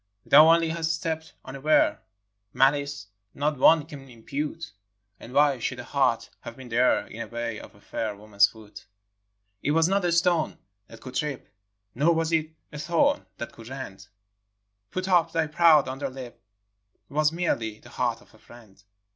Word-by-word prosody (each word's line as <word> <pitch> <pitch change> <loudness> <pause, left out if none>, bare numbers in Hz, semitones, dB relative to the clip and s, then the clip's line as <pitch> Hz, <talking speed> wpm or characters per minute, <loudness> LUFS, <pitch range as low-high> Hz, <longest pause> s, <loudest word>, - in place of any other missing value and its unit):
Thou 155 +3 +8
only 165 -1 +3
hast 165 0 -1
stepped 160 0 -5
unaware, 135 +4 +1 0.3
— 105 +1 -51
Malice, 140 -5 +1 0.3
not 145 -1 -1
one 160 +2 +5
can 140 -4 -11
impute; 145 +7 -5 0.5
And 120 - -11
why 140 -1 +3
should 125 +2 -3
a - - -6
heart 130 -3 0
have 115 - -9
been 130 -2 -11
there 120 +2 +2
In 110 - -11
the 115 - -5
way 115 -1 -4
of - - -13
a 100 - -21
fair 110 -1 -4
woman's 105 -1 +3
foot? 110 -2 -13
hi. - - -23 0.8
It 145 - 0
was 165 +1 +3
not 195 +1 +1
a 175 - +1
stone 170 -2 +1 0.3
that 115 - -14
could 130 +1 -9
trip, 150 -3 -3 0.5
Nor 155 +6 +2
was 165 0 0
it 160 -1 +1 0.2
a 150 - -6
thorn 280 - +1
that 120 - -6
could 115 +1 -13
rend; 115 -8 -8 0.8
Put 185 +6 -4
up 170 -3 +3
thy 165 -1 +1
proud 155 -2 +4
underlip! 130 -2 -6
'T 100 +2 -28
was 150 +1 +2
merely 115 -11 -2
the - - -16
heart - - -2
of - - -22
a - - -20
friend. 110 -5 -17
140 Hz, 180 wpm, -26 LUFS, 115-160 Hz, 0.8 s, Thou